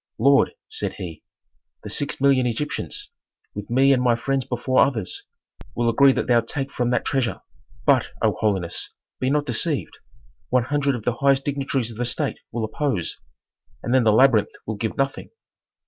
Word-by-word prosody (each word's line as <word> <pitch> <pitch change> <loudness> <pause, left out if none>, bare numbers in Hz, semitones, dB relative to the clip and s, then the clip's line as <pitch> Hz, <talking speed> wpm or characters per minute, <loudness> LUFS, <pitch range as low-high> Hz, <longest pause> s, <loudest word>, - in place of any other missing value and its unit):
"Lord," 140 - +4
said 440 0 -3
he, 85 -5 -8 0.6
"the - - -7
six 145 - -2
million 135 -2 +3
Egyptians, 125 +6 -4 0.4
with 105 0 -7
me 135 +3 +4
and 125 - +2
my 120 -2 +3
friends 135 +3 -1
before 130 +1 0
others, 115 -9 -2 0.5
will 120 -1 +1
agree 135 +4 +6
that - - -1
thou 120 -1 +4
take 135 +4 -4
from 120 -1 -1
that 125 - 0
treasure. 130 -4 -1 0.4
But, 135 -4 +4
O 110 -2 +1
holiness, 95 -6 -1 0.3
be 130 - 0
not 145 +1 +1
deceived; 140 +4 -1 0.5
one 125 -1 +3
hundred 140 +1 0
of 115 - -6
the 120 0 -1
highest 140 -1 +2
dignitaries 135 -4 -1
of 110 - -11
the 120 - -1
state 120 - -2
will 115 -1 -2
oppose, 110 - -2 0.6
and 120 - -1
then 130 -2 +4
the 110 - +4
labyrinth 110 -2 +5 0.2
will 110 - -3
give 110 +2 -3
nothing." 135 0 -2
125 Hz, 175 wpm, -23 LUFS, 115-140 Hz, 0.6 s, agree